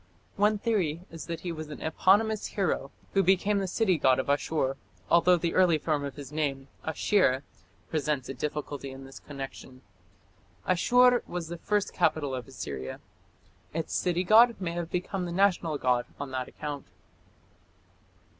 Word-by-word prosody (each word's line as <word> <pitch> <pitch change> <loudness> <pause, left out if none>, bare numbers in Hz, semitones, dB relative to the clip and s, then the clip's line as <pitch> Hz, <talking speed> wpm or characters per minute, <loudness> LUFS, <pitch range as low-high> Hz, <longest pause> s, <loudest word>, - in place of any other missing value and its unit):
One 210 +1 +3
theory 190 -8 0
is 165 -2 -8
that 170 -1 -4
he 175 - -3
was 155 -2 -6
an 150 - -7
eponymous 205 +7 +2
hero 180 -8 -1 0.2
who 195 - +4
became 195 +2 +3
the 195 - -1
city 185 -3 +1
god 130 -2 +4
of 130 - 0
Asshur, 145 -2 0 0.4
although 175 +1 +6
the 170 0 -1
early 180 -4 +4
form 150 -1 -1
of 140 -1 -5
his 140 -2 -9
name, 140 -3 -2
Ashir, 160 -4 +2 0.4
presents 150 -4 -1
a - - -4
difficulty 145 0 -4
in 135 0 -9
this 135 0 -11
connection. 135 -2 -9 0.8
Asshur 245 +7 +5
was 175 -2 -5
the 170 - -5
first 210 +1 0
capital 155 -6 +1
of 125 0 -5
Assyria. 70 - -6 0.8
Its 165 - -3
city 180 0 +1
god 230 +5 +6
may 180 -3 -2
have 170 -1 -4
become 180 +1 -2
the 175 - -4
national 175 -4 +2
god 125 -2 +1
on 140 -1 -5
that 130 -1 -3
account. 145 -5 -6
160 Hz, 160 wpm, -28 LUFS, 140-185 Hz, 0.8 s, although